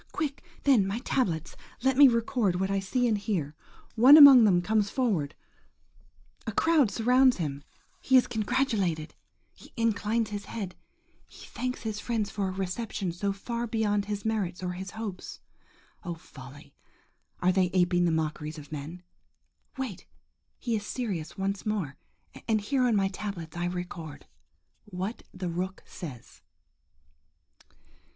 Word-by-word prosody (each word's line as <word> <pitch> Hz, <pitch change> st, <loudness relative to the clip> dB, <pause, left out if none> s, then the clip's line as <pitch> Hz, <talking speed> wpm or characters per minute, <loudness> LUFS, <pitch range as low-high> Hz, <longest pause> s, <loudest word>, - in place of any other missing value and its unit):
Quick, 295 Hz, -2 st, -3 dB, 0.2 s
then, 245 Hz, -9 st, +4 dB
my 200 Hz, +3 st, -2 dB
tablets! 170 Hz, -, -1 dB, 0.3 s
Let 265 Hz, 0 st, +3 dB
me 280 Hz, +1 st, +9 dB
record 230 Hz, -6 st, +1 dB
what 190 Hz, +1 st, 0 dB
I 195 Hz, -, +1 dB
see 245 Hz, +6 st, 0 dB
and 225 Hz, -, +2 dB
hear. 195 Hz, -8 st, -2 dB, 0.4 s
One 260 Hz, +7 st, +8 dB
among 275 Hz, -6 st, +10 dB
them 180 Hz, -4 st, +3 dB
comes 215 Hz, +1 st, +1 dB
forward–a 200 Hz, -, -6 dB
crowd 315 Hz, -8 st, +3 dB
surrounds 250 Hz, +5 st, +4 dB
him–he 150 Hz, -, -1 dB
is 250 Hz, -, +5 dB
congratulated–he 215 Hz, -, -3 dB
inclines 225 Hz, 0 st, 0 dB
his 205 Hz, 0 st, -5 dB
head–he 195 Hz, -6 st, -10 dB
thanks 250 Hz, 0 st, -4 dB
his 215 Hz, -2 st, -3 dB
friends 220 Hz, -2 st, -2 dB
for 200 Hz, -2 st, -2 dB
a -, -, -2 dB
reception 190 Hz, 0 st, -3 dB
so 200 Hz, +4 st, -2 dB
far 235 Hz, +4 st, -4 dB
beyond 210 Hz, -3 st, 0 dB
his 205 Hz, 0 st, -4 dB
merits 195 Hz, -5 st, -2 dB
or 180 Hz, -, -2 dB
his 185 Hz, +2 st, -6 dB
hopes.... 210 Hz, -3 st, -7 dB, 0.6 s
Oh, 175 Hz, -2 st, -4 dB
folly! 135 Hz, -3 st, -13 dB, 0.7 s
are 180 Hz, -, +3 dB
they 185 Hz, -1 st, +2 dB
aping 175 Hz, -1 st, +2 dB
the 170 Hz, -, +2 dB
mockeries 155 Hz, -1 st, -2 dB
of 150 Hz, -1 st, -11 dB
men? 155 Hz, +4 st, -7 dB, 0.7 s
Wait! 255 Hz, -9 st, -5 dB, 0.5 s
he 235 Hz, -3 st, -2 dB
is 210 Hz, -, -3 dB
serious 205 Hz, -9 st, -4 dB
once 195 Hz, 0 st, -2 dB
more, 195 Hz, -10 st, -2 dB, 0.5 s
and 220 Hz, -2 st, +2 dB
here 255 Hz, +5 st, 0 dB
on 230 Hz, -, +2 dB
my 195 Hz, -1 st, +2 dB
tablets 190 Hz, -5 st, -6 dB
I 175 Hz, 0 st, -2 dB
record, 175 Hz, -3 st, -6 dB, 0.6 s
WHAT 200 Hz, +3 st, -5 dB
THE 185 Hz, -1 st, -5 dB
ROOK 185 Hz, +3 st, -4 dB
SAYS. 135 Hz, -11 st, -10 dB
200 Hz, 140 wpm, -28 LUFS, 175-230 Hz, 0.7 s, among